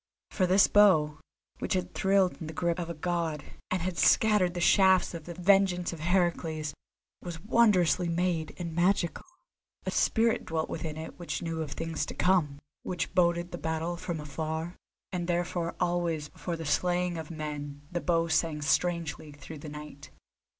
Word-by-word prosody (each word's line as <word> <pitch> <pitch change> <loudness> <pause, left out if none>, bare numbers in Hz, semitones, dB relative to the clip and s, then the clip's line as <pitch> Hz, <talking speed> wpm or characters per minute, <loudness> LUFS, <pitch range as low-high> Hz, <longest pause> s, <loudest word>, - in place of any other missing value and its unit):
For 185 -3 +1
this 190 +2 +6
bow, 155 -8 +4 0.4
which - - -1
had 185 - -2
thrilled 190 -2 +2
in 160 - -5
the 160 - -6
grip 170 +1 0
of 170 -1 -4
a 170 - -4
god, 165 -2 -2 0.3
and 185 -2 -1
had 180 -1 -3
scattered 210 -5 +4
the - - -2
shafts 190 +1 +4
of 165 -2 -7
the 175 - -7
vengeance 180 -1 +3
of 165 - -8
Heracles, 165 -3 0 0.5
was 175 -2 -6
wondrously 185 -5 +3
made 170 -2 -1
and 170 -2 -5
magical. 175 - +1 0.6
A - - -1
spirit 225 0 +2
dwelt 160 -1 -2
within 155 -1 -4
it 160 +2 -8
which 175 - -4
knew 165 -1 -3
of 150 -3 -4
things 165 -2 -3
to - - -6
come, 175 -6 +2 0.2
which 175 -2 -3
boded 175 -1 +2
the 175 - -6
battle 160 +2 -2
from 170 -1 -4
afar, 160 +3 -4 0.4
and 175 -2 -3
therefore 175 -1 -1
always 170 -4 0
before 175 - -5
the 165 -1 -6
slaying 175 +2 0
of 160 - -7
men 145 -2 -6
the 175 -1 -2
bow 165 -1 +1
sang 160 -2 0
strangely 165 0 0
through 145 +2 -10
the 150 - -8
night. 150 -1 -10
170 Hz, 170 wpm, -29 LUFS, 160-180 Hz, 0.6 s, this